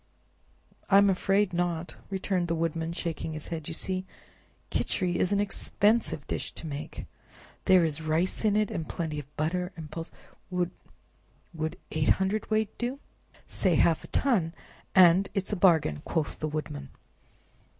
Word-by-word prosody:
"I'm 200 0 +6
afraid 195 +1 +2
not," 175 -1 -1
returned 190 -2 0
the 165 - 0
Woodman, 165 0 -1
shaking 165 -2 -3
his 155 -1 -7
head; 160 -3 -4
"you 165 - -3
see 185 +1 -1 0.7
Khichri 180 -2 0
is 185 - +1
an 200 - +3
expensive 205 -3 +1
dish - - -3
to - - -7
make—there 165 +4 -1
is 160 0 -2
rice 160 +6 0
in 210 -2 +3
it, 215 -1 +2
and 160 - -4
plenty 160 -4 -3
of 145 +1 -12
butter, 180 +4 -1
and 155 -2 -8
pulse, 165 0 -5
and—" - - -26 1.4
"Would—would 160 -1 -3 0.2
eight 155 -1 +1
hundredweight 215 +2 0
do?" 245 +3 -2 0.5
"Say 185 -4 +1
half 165 +1 +3
a - - -9
ton, 190 -12 +1 0.4
and 185 +1 +7
it's 195 +1 -1
a - - +2
bargain!" 160 - +3
quoth 160 -4 -2
the 155 - -1
Woodman. 145 - -4
175 Hz, 150 wpm, -28 LUFS, 160-195 Hz, 1.4 s, and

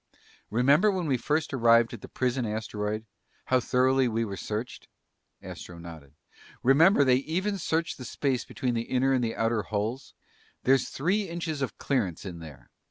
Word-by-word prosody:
"Remember 140 - +4
when 185 -3 -1
we 140 -4 +1
first 150 +6 -1
arrived 115 -2 +4
at 115 - -8
the - - -9
prison 130 0 -1
asteroid? 110 0 -3 0.4
How 130 - +3
thoroughly 130 +1 +2
we 115 0 0
were 100 -2 -5
searched?" 110 +4 -5 0.6
Astro 90 - -9
nodded. 80 -4 -11 0.5
"Remember, 145 - +6
they 130 -2 +4
even 185 +8 -2
searched 160 -3 -1
the 125 - -7
space 130 +1 -1
between 125 -3 -3
the 115 - 0
inner 130 +1 +2
and 130 -2 +1
outer 115 -1 0
hulls? 110 +5 -4 0.5
There's 135 0 +3
three 190 +7 0
inches 165 -3 -4
of 130 -5 -3
clearance 105 - -1
in 90 -3 -6
there. 70 -7 -12
125 Hz, 165 wpm, -28 LUFS, 110-140 Hz, 0.6 s, Remember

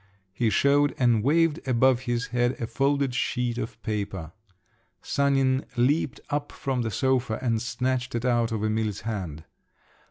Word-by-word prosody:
He 115 +3 +1
showed 140 +7 +3
and 120 -4 +3
waved 160 +5 +2
above 130 0 +4
his 120 -1 -2
head 120 0 +1
a 115 - -2
folded 135 +3 0
sheet 125 0 -1
of 115 0 -5
paper. 100 -7 -3 0.7
Sanin 135 -1 +2
leaped 135 +3 +1
up 145 0 -2
from 130 -2 -2
the 115 - -1
sofa 125 0 0
and 115 -3 0
snatched 125 +1 -2
it 120 +1 -2
out 120 -2 +2
of 110 -2 -2
Emil's 110 -2 -1
hand. 90 -9 -5
120 Hz, 150 wpm, -26 LUFS, 110-135 Hz, 0.7 s, above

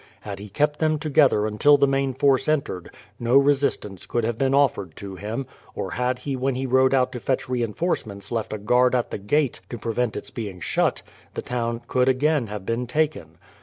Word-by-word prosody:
Had 100 -2 -7
he 105 +1 -9
kept 150 +8 0
them 155 -1 +2
together 145 -8 +3
until 110 +8 +4
the 140 - +4
main 135 -1 0
force 135 0 +3
entered, 140 - -1 0.3
no 120 +3 +3
resistance 140 -9 +1
could 120 - -1
have 115 +1 0
been 135 0 +2
offered 120 - +1
to 100 -1 -8
him, 110 +7 -4 0.3
or - - -4
had 125 +1 0
he 135 +2 -4
when 130 0 -1
he 130 +1 -2
rode 130 +1 +4
out 130 -1 +2
to 125 - -5
fetch 130 +2 -1
reinforcements 115 - -2
left 115 -2 -2
a 110 - -2
guard 125 +4 +3
at 120 - -1
the - - -4
gate 135 +7 +1
to 120 - -5
prevent 115 +1 -2
its - - -7
being 100 -6 -6
shut, - - 0 0.3
the - - -4
town 120 -1 -2
could 130 0 +2
again 140 0 +2
have 105 -2 -6
been 115 +3 -2
taken. 125 - -1
125 Hz, 205 wpm, -24 LUFS, 110-135 Hz, 0.3 s, until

